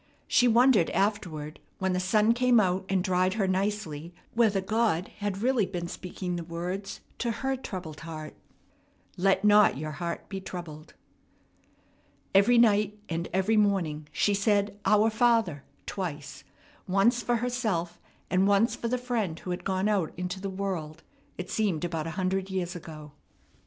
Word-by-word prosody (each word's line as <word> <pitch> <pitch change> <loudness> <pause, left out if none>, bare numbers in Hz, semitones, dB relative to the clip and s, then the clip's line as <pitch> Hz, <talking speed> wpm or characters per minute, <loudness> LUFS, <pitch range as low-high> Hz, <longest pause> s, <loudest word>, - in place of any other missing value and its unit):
She 245 - +4
wondered 235 -5 +5
afterward 180 -7 -2 0.2
when 190 -1 0
the 180 - 0
sun 210 +4 +3
came 245 -1 +4
out 190 -1 +1
and 190 -2 +1
dried 185 0 +1
her 200 -4 +1
nicely 185 -4 -2 0.2
whether 220 -4 +3
God 210 -2 0
had 205 0 -3
really 245 -6 +2
been 175 -2 -4
speaking 180 0 -5
the 170 - -4
words 180 +4 -5 0.2
to 235 - -1
her 265 +4 -1
troubled 180 - -7
heart, 155 -2 -7 0.8
"Let 195 +2 +2
not 210 -8 +6
your 155 +2 -4
heart 170 +3 -5
be 195 -1 -5
troubled." 170 -4 -8 1.4
Every 200 +5 +5
night 210 -3 +4
and 165 +1 -3
every 190 +4 +2
morning 175 -8 +1
she 205 - +1
said 205 0 +1
"Our 215 +1 +4
Father" 220 - +2 0.2
twice, 155 -7 -5 0.4
once 200 +6 +3
for 240 +1 +1
herself 220 -8 -2 0.3
and 190 +1 +2
once 205 +4 +3
for 235 - -4
the 250 +2 0
friend 235 -9 -2
who 180 - -6
had 180 - -4
gone 190 +1 0
out 200 -6 0
into 180 +1 -4
the 195 - -3
world, 185 -5 -4 0.3
it 180 0 -6
seemed 190 -7 0
about 165 -2 -3
a 160 - -6
hundred 190 0 -1
years 180 -2 -3
ago. 155 -3 -9
190 Hz, 155 wpm, -28 LUFS, 175-215 Hz, 1.4 s, not